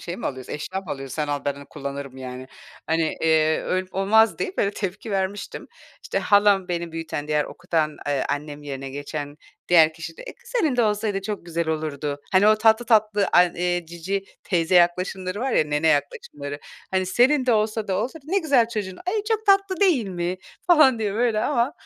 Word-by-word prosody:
şey 175 +1 -6
mi - - -4
alıyoruz, 130 -2 -6
eşya 185 +6 -4
mı - - -17
alıyoruz? 135 -2 -5
Sen 150 -2 -2
al 145 -1 -2
ben 140 0 -3
kullanırım, 140 -1 -7
yani." 130 0 -7 0.4
Hani, 160 0 0
iii, 160 -1 +3
"Öyle 185 0 -1
olmaz!" 200 0 +3
deyip 370 - -4
böyle 200 - +2
tepki 205 +2 -5
vermiştim. 195 +1 -3 0.4
İşte, - - -2
halam 200 -2 +3
beni 170 -1 -3
büyüten, 160 -2 -5
diğer 150 -1 +1
okutan, 160 -4 -2
eee, 140 -2 0
annem 145 0 -4
yerine 135 -1 -6
geçen 145 +1 -6 0.3
diğer 160 -3 +6
kişi 165 0 -8
de - - -10
kı 480 0 -12
senin 330 - +1
de 240 - +4
olsaydı 210 -2 0
çok 200 -3 -5
güzel 170 -1 -2
olurdu. 150 -2 -3
Hani, 195 +3 +5
o 215 - +5
tatlı 220 +2 +4
tatlı 215 -3 +3
an 175 -1 +5
eee, 175 -1 -1
cici 185 +4 -4 0.2
teyze 175 -1 0
yaklaşımları 185 +3 +2
var 265 0 -1
ya, - - +3
nene 150 +2 0
yaklaşımları, 145 -1 -2 0.3
hani, 185 -1 0
senin 255 +7 +3
de 245 - +4
olsa 215 0 0
da 190 - 0
olsa, 265 +10 -3
"Ne 375 +6 +1
güzel 275 -10 +3
çocuğun, 200 -5 -4
ay, 415 +2 0
çok 435 -1 -1
tatlı 390 -2 +3
değil 315 - +3
mi!" 175 0 -3 0.3
falan 305 -9 +6
diye 205 -2 -2
böyle 225 -1 +1
ama, 250 +1 +1
185 Hz, 190 wpm, -23 LUFS, 155-220 Hz, 0.4 s, diğer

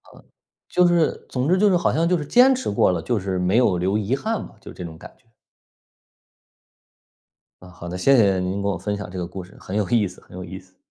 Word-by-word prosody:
嗯。 - - -17 0.5
就 180 0 +3
是， 170 -2 +1
总 130 +3 -2
之 185 +1 +3
就 210 - +4
是 185 - +3
好 175 - +1
像 165 +1 +1
就 180 - +2
是 150 - -4
坚 250 - +5
持 260 - -3
过 100 - +2
了， 85 -2 -2
就 120 +5 -1
是 95 -1 -3
没 90 +4 +1
有 120 -7 +3
留 95 +4 0
遗 110 +4 -1
憾 220 +10 -3
吧， - - -16
就 - - -11
这 90 - -8
种 80 -1 -8
感 - - -12
觉。 115 - -34 2.3
啊， 90 - -13
好 85 0 -10
的。 90 - -5
谢 135 +9 +4
谢 100 -6 +3
您 95 +2 -2
给 100 - -2
我 100 - -1
分 105 -1 -3
享 100 -3 -7
这 95 - -8
个 90 - -3
故 95 +1 -8
事， 90 - -17
很 95 - -7
有 105 -3 0
意 110 -4 +2
思 90 - -14
很 90 - -14
有 90 - -6
意 95 +1 -8
思。 95 0 -24
100 Hz, 275 characters per minute, -22 LUFS, 90-145 Hz, 2.3 s, 坚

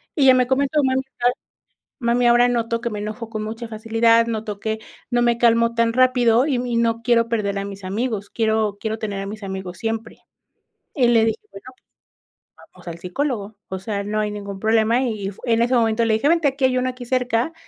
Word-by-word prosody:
y 290 - +2
ella 260 -1 +8
me 250 -1 +3
comentó: 280 +3 +1
"Mami, 260 0 +1 1.0
mami 240 +1 +2
ahora 240 +1 +5
noto 230 -1 -1
que 235 - -2
me 210 -1 -5
enojo 215 +2 -5
con 215 -1 -4
mucha 225 +2 -6
facilidad, 230 +1 +2
noto 220 -3 -4
que 220 0 -2 0.3
no 240 - +2
me 240 -1 +3
calmo 230 0 +3
tan 230 0 +2
rápido 250 0 +3
y 280 -4 +1
no 245 - -2 0.3
no 230 - -17
quiero 230 -1 +2
perder 205 -4 -1
a 200 - -3
mis 200 -1 -9
amigos, 205 +1 -3
quiero 220 -2 0
quiero 220 0 -3
tener 205 -3 -4
a - - -5
mis 210 +2 -7
amigos 190 -2 -6
siempre", 225 0 -4 0.8
y 255 -5 +3
le 225 -2 +4
dije: 225 -1 -1
"Bueno, 195 +3 -12 1.1
vamos - - -17
al 165 - -7
psicólogo", 215 +2 -3
o 190 - -4
sea, 200 +1 -3
no 210 +1 -2
hay 210 0 -2
ningún 200 -1 -7
problema 220 +3 +2
y 215 -6 -3
fu 200 - -17
en 230 -1 +2
ese 245 +2 +2
momento 225 -1 +2
le 220 -1 +2
dije: 220 +6 0
"Vente, 330 -3 +3
aquí 270 0 -1
hay 255 -1 +2
uno 255 0 0
aquí 250 -1 -8
cerca, 250 +3 0
230 Hz, 210 wpm, -21 LUFS, 215-245 Hz, 1.1 s, ella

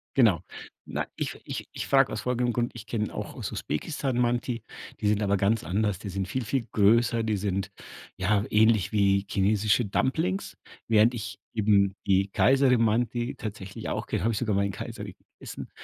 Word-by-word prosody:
Genau. 110 - +4 0.5
Na, - - -2
ich - - -4
ich - - -6
ich - - -4
frage - - +4
aus - - -3
folgendem 125 -1 0
Grund: 120 0 -1
Ich 115 -2 -9
kenn 105 -3 -2
auch - - -6
aus - - -5
Usbekistan 130 - -3
Manti, 120 -1 0 0.4
die 105 - 0
sind 105 0 +2
aber 100 -1 +2
ganz 100 +2 +1
anders. 100 +3 0
Die 100 - -6
sind 95 0 -3
viel, 125 +4 -3
viel 125 +1 -1
größer, 115 +3 +3
die 110 -1 0
sind, 100 0 -2 0.4
ja, 100 +2 +1
ähnlich 110 -2 +3
wie 100 -1 +3
chinesische 105 +3 +2
Dumplings, 165 - -1 0.3
während 115 +2 +5
ich 110 -2 -6
eben 100 -3 +3
die 95 0 +2
Kayseri 135 +3 +4
Mantı 120 +2 +1
tatsächlich 100 -3 -6
auch - - -2
ke - - -1
habe 115 +5 +1
ich 110 - -2
sogar 110 -2 0
mal 100 0 +2
in 100 - -2
Kayseri - - -7 0.2
gegessen. - - -8
110 Hz, 180 wpm, -27 LUFS, 100-120 Hz, 0.5 s, während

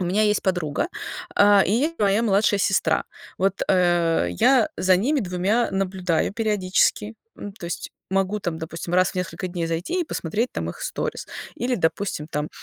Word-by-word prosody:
У - - 0
меня 190 +5 +1
есть 210 -1 +2
подруга, 175 - -1 0.5
э, 205 -1 +6
и - - 0
есть 290 +9 +1
моя 205 +2 +2
младшая 205 -1 +2
сестра. 185 -5 +1 0.3
Вот, 195 +1 0
э, 175 - +3
я 260 - +4
за 185 -1 +4
ними 275 +9 +1
2 195 +4 0
наблюдаю 185 -3 -1
периодически. 210 0 +1 0.2
М, 205 - -7
то 180 - -9
есть 170 - -5 0.2
могу 195 +2 0
там, 165 -3 -3
допустим, 165 +1 -6
раз 185 0 +4
в - - -18
несколько 180 0 -3
дней 175 -2 -3
зайти 170 - -2
и - - 0
посмотреть 220 - -2
там - - -3
их - - -12
сторис - - -4 0.3
или, 250 +1 -1
допустим, 160 -3 -1
там 150 +1 -2
190 Hz, 175 wpm, -23 LUFS, 175-210 Hz, 0.5 s, э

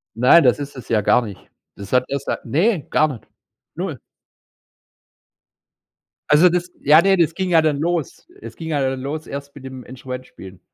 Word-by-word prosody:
Nein, 125 +8 +6
das 125 +2 +3
ist 145 0 -7
es 125 -3 -11
ja 110 -2 +2
gar 125 +4 +3
nicht. 105 -5 -8 0.4
Das 100 +2 -9
hat 125 0 +3
erst 140 0 -4
seit - - -4
ne, 170 - +1
gar 155 - +3
nicht. 130 -7 -9 0.5
0. - - -5 2.3
Also 150 +5 +6
das 175 0 -1
ja, 150 +3 +6
ne, 195 0 +3
das 165 -2 +2
ging 185 +1 -3
ja 165 -2 +5
dann 155 -3 0
los. 170 - -3
Es - - -10
ging 160 - -8
ja 145 -3 0
dann 130 0 -3
los 150 +4 -5
erst 140 0 -8
mit 135 -2 -12
dem 130 -1 -9
Instrument 130 0 -8
spielen. 95 -1 -13
140 Hz, 190 wpm, -20 LUFS, 125-165 Hz, 2.3 s, Nein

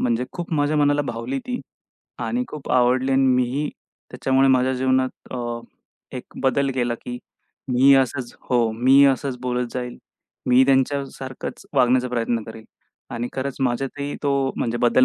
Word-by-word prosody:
म्हणजे 120 0 +1
खूप 175 -1 -6
माझ्या 145 +1 +1
मनाला 145 0 +3
भावली 120 +1 -4
ती 250 0 -3 0.7
आणि 245 +1 -1
खूप 150 -2 -8
आवडली 130 +1 +3
अन् 135 0 +4
मीही 125 +4 0 0.4
त्याच्यामुळे 135 0 +2
माझ्या 130 0 +3
जीवनात 130 0 +1 0.2
अ, 120 -1 -4 0.6
एक 125 - -6 0.2
बदल 135 +1 +2
केला 120 -2 0
की 125 0 -5 0.5
मी 135 +3 +6
असंच 130 -2 -1 0.2
हो, 120 -3 +3
मी 130 +5 +5
असंच 135 -1 0
बोलत 125 -1 -1
जाईल. 125 -1 -4 0.5
मी 125 - +4
ही 130 - +7
त्यांच्यासारखंच 135 -1 -1
वागण्याचा 125 0 +3
प्रयत्न 115 -1 -1
करीन 110 0 -10 0.5
आणि 120 +1 -3
खरंच 135 0 -3
माझ्यातही 135 +3 -2
तो 140 -1 +1 0.2
म्हणजे 120 0 -1
बदल 125 +1 +4
130 Hz, 150 wpm, -22 LUFS, 125-135 Hz, 0.7 s, ही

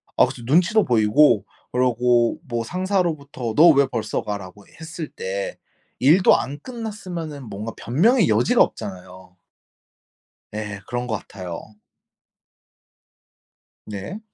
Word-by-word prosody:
아 - - +6
그쵸. 120 - -9
눈치도 175 - +3
보이고 115 +1 +4 0.3
그러고 125 +2 +2
뭐 120 -2 -2
상사로부터 160 - -2
"너 165 +3 +8
왜 140 -3 +5
벌써 115 -4 -3
가?"라고 100 -1 -7
했을 160 0 -7
때 - - -5 0.4
일도 160 +9 +5
안 145 +2 -5
끝났으면은 185 - -6
뭔가 105 +3 -6
변명의 205 - +2
여지가 110 +3 +3
없잖아요. 90 -1 -4 1.2
예. 105 -2 -5
그런 120 +1 -3
것 110 - -1
같아요. 90 -3 -7 2.3
네. 105 - -6
125 Hz, 235 characters per minute, -22 LUFS, 110-170 Hz, 2.3 s, 너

